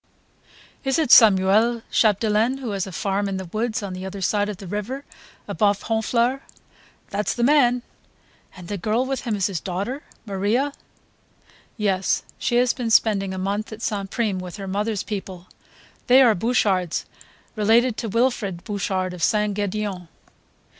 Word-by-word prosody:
"Is 270 -1 +1
it 310 -6 +1
Samuel 220 +2 +6
Chapdelaine 220 +3 +2
who 255 -5 -5
has 195 -1 -2
a - - -7
farm 200 +3 -1
in 195 - -3
the 190 - -5
woods 215 +4 -2
on 195 -2 -5
the 185 0 -6
other 190 +1 -6
side 205 +2 0
of 205 - -5
the 195 - -10
river, 210 +9 -4 0.4
above 205 -2 +1
Honfleur?" 235 +4 0 0.7
"That's 205 +1 -1
the 240 - -1
man." 250 -3 +4 0.7
"And 180 -1 -10
the 205 0 -4
girl 225 +7 0
with 265 -1 -3
him 225 -3 0
is 195 -2 0
his 195 -5 -1
daughter? 200 - -4 0.2
Maria 210 +8 0 0.5
..." - - -31
"Yes, 195 -3 0 0.2
she 240 - 0
has 245 0 +3
been 245 -3 -3
spending 205 -3 +3
a 190 - -5
month 200 +4 -2
at 220 +2 -8
St. 200 -3 -2
Prime 210 -4 -1
with 180 +1 -7
her 195 -1 -6
mother's 205 +1 -1
people. 190 -4 -6 0.6
They 260 +2 +7
are 235 -3 +5
Bouchards, 190 -5 0 0.5
related 225 +3 +3
to 225 - -3
Wilfrid 210 -6 0
Bouchard 190 -3 -2
of 180 - -9
St. 210 +1 +2
Gedeon 205 -3 -3
210 Hz, 165 wpm, -23 LUFS, 195-235 Hz, 0.7 s, They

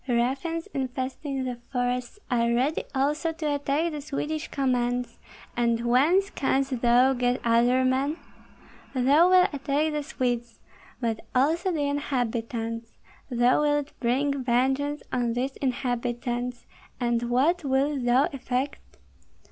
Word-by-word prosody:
Ruffians 270 +7 0
infesting 265 +1 -3
the 250 -2 -4
forests 245 +3 -1
are 235 -1 +2
ready 260 +6 +1
also 300 +4 +1
to 310 -2 -2
attack 285 +4 0
the 300 -1 -5
Swedish 300 +2 -3
commands, 250 -2 -1 0.4
and 235 -1 +1
whence 315 +12 +3
canst 265 -2 0
thou 245 +2 +5
get 245 0 0
other 240 +2 +3
men? 270 +4 +1 0.8
Thou 285 +7 +5
wilt 370 -1 +5
attack 285 +2 0
the 300 0 -1
Swedes, 245 -5 -3 0.4
but 225 -3 -1 0.2
also 320 +8 +2
the 300 -4 0
inhabitants; 230 -4 -2 0.4
thou 245 +2 +3
wilt 290 -1 +1
bring 275 +3 0
vengeance 265 +4 +1
on 240 -2 0
these 260 +3 -2
inhabitants, 245 -1 -2 0.3
and 240 -1 0
what 295 +9 +2
wilt 275 0 +1
thou 245 +3 +4
effect? 265 +1 -2
260 Hz, 125 wpm, -26 LUFS, 245-290 Hz, 0.8 s, thou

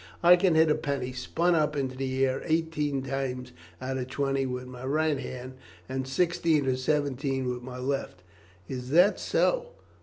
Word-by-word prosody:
"I 175 +1 +9
can 180 -2 +2
hit 160 -1 +5
a - - +6
penny 140 -4 -2
spun 165 +8 0
up 150 -2 +2
into 130 -2 -2
the 130 0 0
air 130 0 -1
eighteen 155 -4 0
times 130 -2 -3 0.3
out 130 +1 -3
of 125 - -3
twenty 135 0 0
with 125 0 -4
my 125 0 -10
right 150 +1 +1
hand, 130 0 -6 0.3
and 130 0 -3
sixteen 165 0 +2
or 130 -1 +2
seventeen 135 -1 -1
with 125 0 -3
my 125 0 -8
left." 130 -8 -3 0.4
"Is 125 -1 -5
that 180 +8 +5
so? - - +1
135 Hz, 175 wpm, -28 LUFS, 130-155 Hz, 0.4 s, I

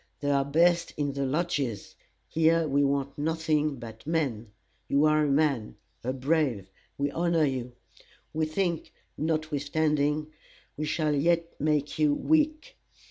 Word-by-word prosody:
They 145 0 0
are 140 -1 +3
best 170 +5 +2
in 145 -2 -1
the 140 -1 -1
lodges; 140 - -2 0.3
here 165 0 +3
we 140 0 +2
want 140 0 -1
nothing 155 -1 0
but 115 0 -10
men. 130 -10 -1 0.4
You 140 +2 +3
are 155 0 +4
a - - 0
man 140 -6 +1 0.3
a 125 - -1
brave 130 - 0 0.3
we 140 0 0
honor 170 -1 +2
you. 125 -3 -3 0.6
We 155 0 0
think, 170 +1 -2 0.2
notwithstanding, 150 -1 0 0.4
we 155 - -3
shall 155 0 0
yet 165 +3 +1
make 150 0 0
you 150 -2 +4
weak. 310 - +1
150 Hz, 135 wpm, -28 LUFS, 140-160 Hz, 0.6 s, are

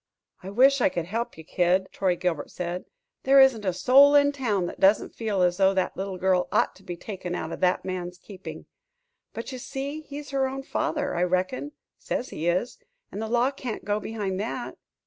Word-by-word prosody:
"I 185 - -7
wish 265 +6 +4
I - - +4
could 170 -2 -3
help 225 +4 -3
you, 160 - -10
Kid," 180 +3 +1
Troy 185 -2 +1
Gilbert 170 -4 -2
said. 180 0 -4 0.4
"There 275 +1 +5
isn't 265 -5 +5
a 185 - +2
soul 270 +10 +6
in 285 0 +5
town 225 -10 -1
that - - -7
doesn't 195 +3 +3
feel 210 -5 0
as 175 0 +2
though 195 0 +4
that 185 - 0
little 190 0 -4
girl 180 -1 +2
ought - - +2
to 195 - -19
be 175 -2 -6
taken 180 -2 -5
out 160 - -4
of - - -5
that 180 -1 +1
man's 180 -1 -4
keeping. 190 +1 -10 0.7
But 230 - -6
you 255 - -6
see 280 +5 -5
he's 290 -1 -9
her 270 -1 +1
own 270 +1 -5
father, 295 -1 -1
I - - 0
reckon 185 +11 -1 0.3
says 250 - -3
he 160 - -4
is 185 - 0 0.3
and 205 - -5
the 220 - -3
law 245 +3 +2
can't 250 -7 -6
go 205 +1 0
behind 205 -4 -3
that." 235 +4 -4
200 Hz, 205 wpm, -26 LUFS, 180-265 Hz, 0.7 s, soul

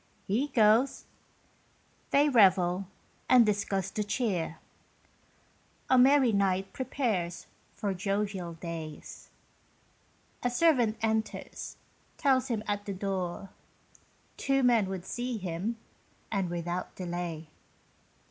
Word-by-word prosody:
He 235 +9 0
goes 230 0 +3 1.0
they 285 +1 +4
revel 190 -6 +4 0.4
and 250 -2 +7
discuss 195 -2 -1
the 210 - -1
cheer; 200 -7 -1 1.3
A 260 - +6
merry 265 -1 +6
night 195 -1 0
prepares 210 -10 -2 0.3
for 200 -2 -2
jovial 195 -2 -2
days. 165 -2 -8 1.1
A 245 - +1
servant 245 -5 +3
enters, 220 0 -2 0.4
tells 265 -3 +2
him 225 -5 -2
at 205 0 -2
the 200 - -2
door 190 -1 -3 0.9
Two 270 -1 +1
men 230 -6 +4
would 190 -2 -5
see 245 -1 -3
him, 190 +4 -3 0.5
and 195 -4 0
without 175 +1 -4
delay. 175 -3 -5
200 Hz, 100 wpm, -29 LUFS, 180-240 Hz, 1.3 s, and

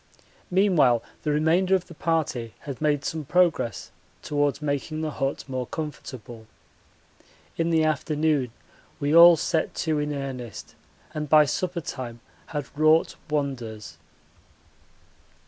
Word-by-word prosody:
Meanwhile 175 - +3 0.2
the 150 - -2
remainder 165 +6 +3
of 180 -1 -1
the 170 - -12
party 155 -9 -1
had 140 -2 -7
made 145 -2 +1
some 160 -1 -3
progress 160 - +1 0.3
towards 145 -1 0
making 150 +1 -2
the 155 -1 -2
hut 135 0 -3
more 130 -2 -3
comfortable. 125 -7 -7 1.1
In 165 0 0
the 160 -1 +3
afternoon 150 -3 0 0.5
we 145 +2 +1
all 170 0 +9
set 160 +1 -1
to 155 -2 +1
in 150 0 -2
earnest 135 -5 -6 0.4
and 150 -2 -4
by 155 -1 +7
supper 175 +4 -2
time 120 -5 -6 0.3
had 145 -3 -6
wrought 155 +2 +3
wonders. 130 -8 -4
150 Hz, 125 wpm, -25 LUFS, 135-160 Hz, 1.1 s, all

